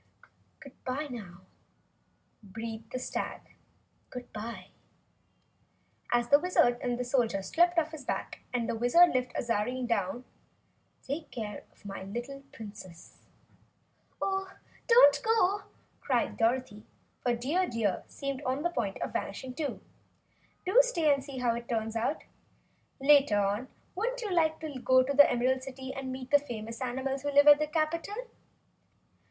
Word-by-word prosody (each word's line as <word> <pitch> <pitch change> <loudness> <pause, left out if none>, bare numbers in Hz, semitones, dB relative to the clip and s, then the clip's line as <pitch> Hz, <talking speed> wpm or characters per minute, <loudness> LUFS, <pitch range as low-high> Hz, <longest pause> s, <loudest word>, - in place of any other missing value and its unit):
"Goodbye, 275 0 -5
now," 195 -7 -9 1.0
breathed 225 +2 -7
the - - -3
stag, 255 - -4 2.7
as 240 0 +2
the 285 - +7
Wizard 270 -8 +3
and 245 0 -1
Soldier 235 -6 +1
slipped 345 - +2
off 320 -1 +2
his 310 -3 -8
back - - -4
and 240 -2 -1
the - - -1
Wizard 245 +10 +5
lifted 250 -1 -1
Azarine 240 +2 -1
down. 230 +1 -1 0.8
"Take 290 +4 -5
care 210 -4 -6
of - - -27
my 195 -1 -6
little 240 +8 -6
Princess!" 200 -6 -11 1.0
"Oh, 385 0 -1 0.4
don't 465 -12 +7
go!" 410 -3 +2 0.3
cried 250 -4 0
Dorothy, 230 -2 0 0.4
for 245 -1 +1
Dear 305 +10 0
Deer 215 -5 -1
seemed 275 -1 -5
on 265 +2 -2
the 345 - +1
point 200 - -2
of - - -5
vanishing, 255 +6 -4
too. 290 +2 -4 0.8
"Do 385 +7 +5
stay 335 -12 +2
and 275 -1 -2
see 275 -1 -8
how 245 -2 +1
it 235 +1 -6
all 230 - +2
turns 220 0 -4
out. 230 +7 -1 0.8
Later 275 -5 +5
on, 205 +5 0 0.3
wouldn't - - -2
you 415 - -3
like 315 -2 +2
to 295 -5 -5
go 260 +1 +4
to 275 +2 -2
the 285 +1 +8
Emerald 255 +2 +1
City 265 0 -7
and 265 -1 -5
meet 255 0 -7
the 290 - +7
famous 230 -4 -7
animals 265 +2 -2
who 285 +1 -2
live 285 +1 +6
in 295 0 +9
the 305 - 0
capitol?" 320 +5 -1
260 Hz, 145 wpm, -30 LUFS, 230-295 Hz, 2.7 s, in